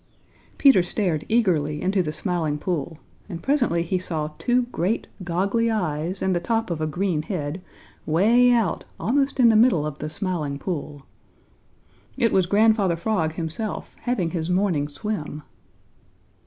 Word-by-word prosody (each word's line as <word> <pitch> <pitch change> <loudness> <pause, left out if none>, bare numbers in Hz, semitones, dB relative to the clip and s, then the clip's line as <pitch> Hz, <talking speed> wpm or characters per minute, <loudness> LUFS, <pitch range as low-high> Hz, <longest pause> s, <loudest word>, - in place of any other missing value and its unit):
Peter 270 -10 +6
stared 175 -3 -1
eagerly 165 -10 +1
into 190 +2 +1
the 155 -4 -2
Smiling 160 -3 -1
Pool, 160 -1 -3 0.3
and 170 -3 -7
presently 245 - +2
he 180 +2 -1
saw 155 -4 -3
two 250 0 +2
great, 190 +5 -1 0.2
goggly 195 +7 0
eyes 175 -3 -2
and 190 -1 +1
the - - +1
top 225 +2 -1
of 160 -2 -3
a 155 - 0
green 175 0 -1
head, 155 -1 -4 0.5
way 225 +10 +4
out 230 -8 +1 0.2
almost 275 +3 0
in 240 -2 +7
the 225 - +4
middle 215 -9 +4
of 150 -1 -5
the 150 - -4
Smiling 160 -4 -3
Pool. 145 -4 -5 1.1
It 235 -4 +2
was 185 -2 +3
Grandfather 205 -2 +3
Frog 165 -3 -1
himself, 170 +6 -4
having 200 -10 -1
his 165 -2 -3
morning 180 -6 +1
swim. 150 -2 -5
180 Hz, 150 wpm, -24 LUFS, 155-215 Hz, 1.1 s, in